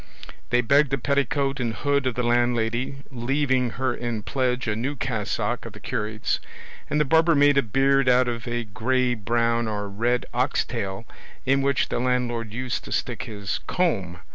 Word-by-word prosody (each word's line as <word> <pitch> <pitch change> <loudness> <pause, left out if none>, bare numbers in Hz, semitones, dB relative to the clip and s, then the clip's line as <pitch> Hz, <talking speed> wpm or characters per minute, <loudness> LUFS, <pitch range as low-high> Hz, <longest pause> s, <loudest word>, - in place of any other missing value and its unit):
They 120 0 +3
begged 140 +4 +3
a - - +3
petticoat 140 +1 0
and 115 -3 -1
hood 140 -2 +1
of 125 - -1
the 125 - -1
landlady, 120 +2 0
leaving 130 0 +1
her 130 0 0
in 120 -3 -4
pledge 125 -1 -1
a 105 - 0
new 130 +6 -2
cassock 115 -6 -2
of - - -8
the - - -11
curate's; 110 +1 -2 0.5
and 150 - +1
the 150 - +3
barber 160 +3 +4
made 145 -1 +5
a - - +4
beard 135 +3 +2
out 125 0 +4
of 120 -1 -3
a 120 0 -1
grey 125 +4 0
brown 115 +1 0
or 105 -1 -3
red 120 +5 0
ox - - +1
tail 95 +3 -4 0.4
in 135 +1 +3
which 140 -1 +1
the - - -1
landlord 120 -3 -1
used 125 +2 -3
to - - -9
stick 115 +3 -2
his 100 -4 -4
comb. 100 - 0
125 Hz, 180 wpm, -25 LUFS, 115-135 Hz, 0.5 s, made